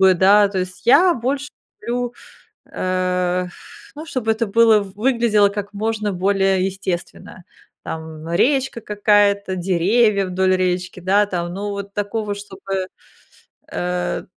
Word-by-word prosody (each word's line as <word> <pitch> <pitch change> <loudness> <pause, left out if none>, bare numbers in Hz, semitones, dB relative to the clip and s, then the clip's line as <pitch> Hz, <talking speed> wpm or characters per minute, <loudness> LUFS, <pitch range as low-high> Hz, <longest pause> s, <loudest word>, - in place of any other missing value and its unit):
да? 200 +3 +5
То 195 -1 -3
есть 185 +4 -6
я 355 +8 +6
больше 270 +3 -3 0.3
люблю, 245 0 -3 0.6
э, 180 -1 -1
эх, 180 - -11 0.4
ну, 310 +2 -8
чтобы 245 -8 -1
это 225 +1 0
было 225 +1 +5
выглядело 215 0 +2
как 205 0 -6
можно 215 0 -2
более 190 0 +1
естественно, 185 -1 -5 0.4
там, 160 0 -7
речка 265 +4 +1
какая-то, 205 -2 +2
деревья 195 +3 +2
вдоль 185 +1 +1
речки, 185 0 -2
да, 195 +3 +3
там, 175 -3 -4
ну, 205 +2 -4
вот 200 0 -6
такого, 205 0 -2
чтобы, 195 -1 -5 0.8
э, 180 0 -2
200 Hz, 125 wpm, -20 LUFS, 185-215 Hz, 0.8 s, я